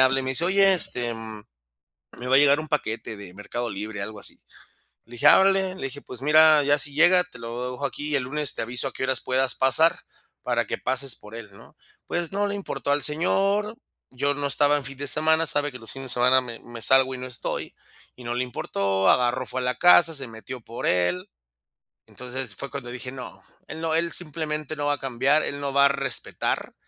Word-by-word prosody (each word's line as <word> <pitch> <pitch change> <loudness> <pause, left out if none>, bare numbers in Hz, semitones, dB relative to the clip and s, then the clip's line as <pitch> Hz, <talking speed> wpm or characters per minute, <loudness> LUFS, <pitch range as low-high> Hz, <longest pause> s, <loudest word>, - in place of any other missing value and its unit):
habla 130 +1 +4
y - - -4
me 130 - -3
dice: 130 +6 -1
"Oye, 195 +1 +4
este, 120 -8 +4
mm, 110 -2 -9 0.7
me 125 - -7
va 130 - +3
a - - +6
llegar 145 0 +5
un 155 - -8
paquete 115 -6 -3
de 100 -3 -11
Mercado 120 +4 -5
Libre", 105 +1 -6
algo 105 +1 -6
así. - - -10 0.7
Le 120 - -19
dije: 120 - -1
"Ah - - +7
órale". 190 -1 +2
Le - - -10
dije: 135 +1 -6
"Pues, 125 0 -8
mira, 155 0 +6
ya 145 +1 +2
si 145 0 -4
llega, 180 +4 +4
te 180 -8 -16
lo 120 +2 -5
dejo 125 +3 -6
aquí, 145 +2 -7
y 150 - +1
el 135 - 0
lunes 150 +2 0
te - - -4
aviso 120 +4 -4
a - - -12
qué - - -7
horas 130 - 0
puedas 130 0 0
pasar, 155 +5 +3 0.4
para - - -1
que - - -3
pases 130 0 -3
por 105 +2 -14
él", 115 -2 -8
¿no? 100 - -17 0.3
Pues 175 0 -2
no 205 +1 0
le 200 - -3
importó 195 -7 -3
al 145 0 +1
señor, 195 +7 0 0.3
yo 140 +3 0
no 145 0 -2
estaba 145 +1 +3
en 145 - -5
fin 135 +2 -8
de 145 - -4
semana, 160 +4 +2
sabe 145 -2 +1
que 125 - -9
los 115 - -1
fines 135 -1 -3
de - - +8
semana 125 +1 +4
me 120 -2 -8
me 120 -1 -10
salgo 130 +1 +5
y - - -7
no 125 - -6
estoy, 125 -2 -3 0.4
y 125 - -13
no 120 - -3
le 125 +1 -1
importó, 100 -5 -1
agarró, 125 +1 +1
fue 130 - -4
a - - -4
la 125 -1 -1
casa, 175 0 +6
se 135 -4 -3
metió 115 +3 -9
por 115 +1 -7
él. 90 0 0 0.8
Entonces, 125 -3 -5
fue 140 - -6
cuando 135 -4 -7
dije: 125 0 -7
"No, 130 -1 -10 0.3
él - - -8
no, 160 -1 -1
él 170 +1 0
simplemente 155 -2 -4
no 145 -1 -3
va 145 - +2
a - - -12
cambiar, 135 +4 +1
él 140 - -3
no 140 -1 -3
va 140 0 +5
a - - +7
respetar". 140 -3 -2
135 Hz, 235 wpm, -24 LUFS, 120-150 Hz, 0.8 s, de